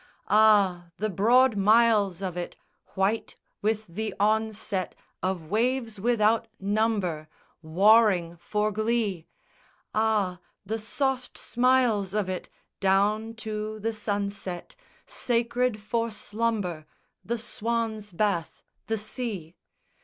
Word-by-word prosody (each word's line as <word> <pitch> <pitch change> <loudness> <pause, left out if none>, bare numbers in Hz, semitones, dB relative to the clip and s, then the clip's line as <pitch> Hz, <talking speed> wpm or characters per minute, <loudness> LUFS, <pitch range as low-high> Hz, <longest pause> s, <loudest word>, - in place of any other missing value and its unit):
Ah, 205 -5 +4
the 215 +1 -1
broad 235 +6 +4
miles 205 -2 +4
of 185 -2 -3
it 175 -1 -5 0.4
White 195 +4 0 0.3
with 215 +1 0
the 215 +5 -4
onset 215 -3 0 0.3
Of 180 -4 -3
waves 230 -1 0
without 225 0 +2
number 200 -6 0 0.3
Warring 185 +1 +4
for 210 +5 -1
glee; 215 -5 -1 0.7
Ah, 210 -5 +1 0.3
the 220 +3 -2
soft 255 +3 -2
smiles 240 -6 +2
of 210 -3 0
it 185 -1 -4 0.3
Down 210 +4 +2
to 215 0 -4
the 225 +2 -2
sunset, 200 -4 -4 0.3
Sacred 240 -1 0
for 230 +3 -1
slumber 210 -7 -2 0.4
The 235 +1 -2
swan's 225 -2 -2
bath, 175 -2 -1 0.2
the 225 - 0
sea! 210 -6 -5
215 Hz, 105 wpm, -27 LUFS, 195-225 Hz, 0.7 s, Ah